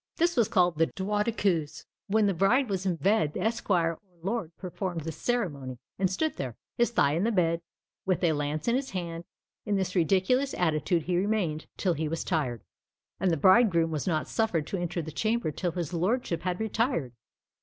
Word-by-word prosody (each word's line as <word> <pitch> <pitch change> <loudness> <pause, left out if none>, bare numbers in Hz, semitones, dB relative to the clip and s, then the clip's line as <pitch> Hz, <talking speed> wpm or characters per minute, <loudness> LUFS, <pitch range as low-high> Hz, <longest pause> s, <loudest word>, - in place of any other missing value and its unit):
This 345 +1 +2
was 235 -5 +3
called 175 -3 +2
the 165 - +4
droit 205 +2 -1
de 235 - +1
cuisse. 160 -8 -1 0.2
When 215 +1 +3
the 200 - +2
bride 230 +9 +3
was 190 -1 -1
in 180 - +1
bed, 160 -2 +2
the - - -2
esquire 195 -7 +1
or - - -15 0.2
lord 200 -3 -2
performed 180 -2 -4
this 160 0 -5
ceremony, 145 - -2 0.2
and 190 -1 +2
stood 310 - -1
there, 125 -4 -4 0.2
his 240 - +3
thigh 180 -11 +3
in 170 +4 +1
the 230 - +2
bed, 170 -4 +2 0.4
with 185 -1 0
a 165 -2 +4
lance 150 +3 -2
in 235 - +3
his 270 +1 -1
hand: 170 -2 -5 0.4
in 210 -2 0
this 190 -1 -1
ridiculous 195 - +2
attitude 165 0 +1
he 175 +1 0
remained 185 -6 0
till 185 -3 +1
he 160 0 -2
was 165 +2 -2
tired; 130 - -1 0.6
and 190 - +2
the 165 - +1
bridegroom 185 - +5
was 155 +1 -2
not 155 -3 0
suffered 220 -9 0
to 195 - -3
enter 175 -1 -2
the 160 - -6
chamber 220 -1 0
till 175 +2 -2
his 175 -1 -3
lordship 180 0 0
had 180 0 -2
retired. 220 - 0
180 Hz, 200 wpm, -28 LUFS, 160-210 Hz, 0.6 s, bridegroom